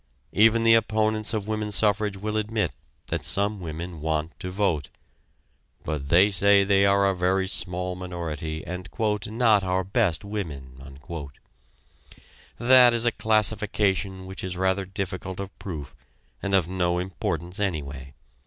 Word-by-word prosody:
Even 115 Hz, +2 st, +4 dB
the 115 Hz, 0 st, +6 dB
opponents 110 Hz, -1 st, +1 dB
of 110 Hz, -3 st, -2 dB
woman 105 Hz, -1 st, -2 dB
suffrage 105 Hz, -1 st, +1 dB
will 105 Hz, +2 st, -4 dB
admit 110 Hz, 0 st, -1 dB, 0.3 s
that 80 Hz, -2 st, -2 dB
some 100 Hz, +6 st, 0 dB
women 85 Hz, -1 st, -6 dB
want 80 Hz, +1 st, -1 dB
to 90 Hz, -1 st, -5 dB
vote, 90 Hz, -6 st, -1 dB, 0.9 s
but 75 Hz, -3 st, -4 dB
they 95 Hz, +5 st, +5 dB
say 100 Hz, +1 st, +4 dB
they 100 Hz, 0 st, +4 dB
are 100 Hz, 0 st, +4 dB
a 95 Hz, -, +1 dB
very 95 Hz, +1 st, +1 dB
small 90 Hz, 0 st, -2 dB
minority, 80 Hz, -4 st, -5 dB
and 90 Hz, 0 st, -6 dB, 0.4 s
"not 110 Hz, -2 st, +3 dB
our 95 Hz, 0 st, 0 dB
best 100 Hz, -2 st, 0 dB
women." 70 Hz, -9 st, -7 dB, 1.6 s
That 125 Hz, 0 st, +6 dB
is 120 Hz, 0 st, +4 dB
a 120 Hz, -, +4 dB
classification 105 Hz, -3 st, +1 dB
which 95 Hz, +1 st, -7 dB
is 90 Hz, -1 st, -4 dB
rather 95 Hz, +1 st, +1 dB
difficult 95 Hz, -1 st, -5 dB
of 100 Hz, -1 st, -6 dB
proof 80 Hz, -8 st, -7 dB, 0.5 s
and 100 Hz, -1 st, 0 dB
of 90 Hz, -4 st, +2 dB
no 90 Hz, -1 st, 0 dB
importance 90 Hz, 0 st, -3 dB
anyway. 70 Hz, -8 st, -4 dB
95 Hz, 140 wpm, -25 LUFS, 85-105 Hz, 1.6 s, the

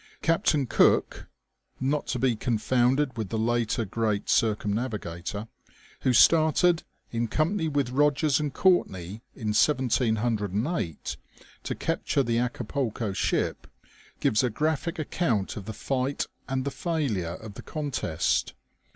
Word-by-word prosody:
Captain 160 Hz, -3 st, +2 dB
Cooke -, -, +2 dB, 0.5 s
(not 140 Hz, +3 st, 0 dB
to -, -, -1 dB
be 130 Hz, -3 st, +2 dB
con 115 Hz, +1 st, -1 dB
founded 130 Hz, +5 st, +2 dB
with 110 Hz, -5 st, -4 dB
the 115 Hz, -, -2 dB
later 115 Hz, 0 st, 0 dB
great 105 Hz, 0 st, -1 dB
circumnavigator), 105 Hz, -3 st, -1 dB, 0.5 s
who 130 Hz, -, +2 dB
started, 160 Hz, +5 st, +5 dB, 0.3 s
in 115 Hz, 0 st, -1 dB
company 160 Hz, -, 0 dB
with 140 Hz, -4 st, 0 dB
Eogers 145 Hz, +1 st, +3 dB
and 150 Hz, -2 st, -1 dB
Courtney, 110 Hz, -, +1 dB
in 110 Hz, -4 st, -3 dB
1708, 110 Hz, -, 0 dB, 0.4 s
to -, -, -4 dB
capture 140 Hz, -, 0 dB
the 115 Hz, -1 st, +1 dB
Acapulco 120 Hz, -3 st, -2 dB
ship, 95 Hz, -, -1 dB, 0.5 s
gives 115 Hz, -7 st, +3 dB
a 125 Hz, -, +1 dB
graphic 155 Hz, +6 st, -1 dB
account 135 Hz, -, -1 dB
of 100 Hz, -, -7 dB
the 110 Hz, -, -5 dB
fight 130 Hz, +5 st, -1 dB, 0.2 s
and 130 Hz, 0 st, -1 dB
the 140 Hz, -, -1 dB
failure 125 Hz, -, -2 dB
of 110 Hz, 0 st, -10 dB
the -, -, -9 dB
contest. 140 Hz, -, -1 dB
125 Hz, 125 wpm, -27 LUFS, 110-145 Hz, 0.5 s, started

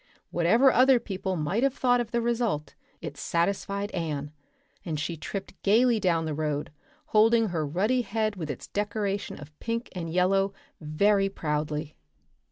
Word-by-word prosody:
Whatever 225 Hz, +11 st, +4 dB
other 255 Hz, 0 st, +5 dB
people 190 Hz, -3 st, -3 dB
might 175 Hz, +7 st, 0 dB
have 275 Hz, 0 st, +2 dB
thought 245 Hz, -1 st, +3 dB
of 235 Hz, -, -5 dB
the 235 Hz, 0 st, 0 dB
result 230 Hz, -10 st, -1 dB, 0.3 s
it -, -, -6 dB
satisfied 200 Hz, +3 st, -1 dB
Anne, 150 Hz, -5 st, -3 dB, 0.5 s
and 155 Hz, -3 st, -3 dB
she 165 Hz, +3 st, -2 dB
tripped 195 Hz, +5 st, -6 dB
gaily 230 Hz, +3 st, +4 dB
down 170 Hz, -5 st, +1 dB
the 155 Hz, -, -2 dB
road, 150 Hz, -1 st, -2 dB, 0.4 s
holding 225 Hz, 0 st, +4 dB
her 160 Hz, -4 st, -1 dB
ruddy 210 Hz, -, +1 dB
head 215 Hz, -2 st, -1 dB
with 160 Hz, -5 st, -5 dB
its 140 Hz, -, -5 dB
decoration 205 Hz, -1 st, -2 dB
of 150 Hz, +1 st, -12 dB
pink 230 Hz, +1 st, -3 dB
and 170 Hz, -3 st, -4 dB
yellow 195 Hz, +3 st, +2 dB, 0.3 s
very 195 Hz, +6 st, +2 dB
proudly. 150 Hz, -3 st, -3 dB
195 Hz, 155 wpm, -27 LUFS, 160-225 Hz, 0.5 s, other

